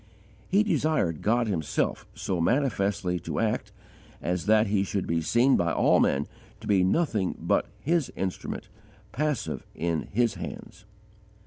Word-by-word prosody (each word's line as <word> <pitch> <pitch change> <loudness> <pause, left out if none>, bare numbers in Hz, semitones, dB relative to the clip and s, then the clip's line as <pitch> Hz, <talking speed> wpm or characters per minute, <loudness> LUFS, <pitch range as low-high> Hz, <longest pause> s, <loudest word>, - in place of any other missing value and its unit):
He 200 +3 +4
desired 155 - +1
God 120 +3 +2
Himself 85 -8 -1
so 90 -3 -2
manifestly 100 - +1
to - - -4
act - - -1 0.5
as 90 +2 -2
that 110 0 +5
he 100 -1 +1
should 100 -1 -2
be 85 0 0
seen 120 - +3
by 85 -1 +1
all - - +4
men 70 +1 +2 0.3
to - - -11
be 100 -3 +3
nothing 105 - +1
but - - +1
His 160 +5 0
instrument, 95 -1 -4 0.4
passive 150 +3 -2
in 85 -1 -1
His 115 +1 +2
hands. 100 - -8
100 Hz, 140 wpm, -27 LUFS, 90-130 Hz, 0.5 s, that